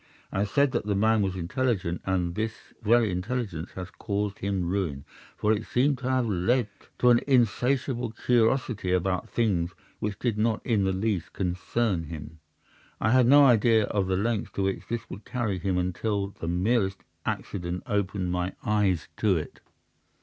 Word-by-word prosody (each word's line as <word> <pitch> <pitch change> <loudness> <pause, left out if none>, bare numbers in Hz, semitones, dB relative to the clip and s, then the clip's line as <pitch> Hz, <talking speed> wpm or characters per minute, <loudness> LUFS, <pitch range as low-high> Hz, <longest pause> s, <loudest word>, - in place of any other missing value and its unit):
I - - -2
have 100 0 0
said 140 +4 +3
that 120 -4 -2
the 100 - +1
man 110 +2 +3
was 95 -2 -1
intelligent, 95 -1 -1
and 90 -2 0
this 110 +3 -5
very 115 -1 +3
intelligence 95 -3 -3
has 95 +2 -7
caused 100 -2 -3
his 100 - -2
ruin, 90 -6 -2 0.3
for 105 +1 +2
it 110 0 -2
seems 135 +2 +2
to 130 -1 -3
have 130 -2 +2
led 105 +4 +1 0.3
to 125 - +5
an 120 - +6
insatiable 125 0 +2
curiosity 115 -4 +1
about 90 0 0
things 90 -7 0 0.2
which 105 -1 -3
did 115 -3 -1
not 110 0 0
in 105 -5 +2
the 95 - +2
least 95 -2 -1
concern 90 0 -1
him. 80 0 -8 0.6
I 110 - +2
had 125 -1 +5
no 145 +2 +8
idea 115 -3 +5
of 100 -3 -1
the 95 -1 +1
lengths 110 +1 -1
to 100 - -1
which 95 0 -2
this 115 -1 -3
would 100 +3 -8
carry 115 -7 -2
him, 95 0 0
until 100 +3 -1
the 85 - -8
merest 95 +3 +1 0.2
accident 90 -1 -3
opened 100 -5 -1
my 90 +1 -1
eyes 100 -5 +1
to 100 -5 +3
it. 75 - -6
100 Hz, 170 wpm, -27 LUFS, 90-115 Hz, 0.6 s, no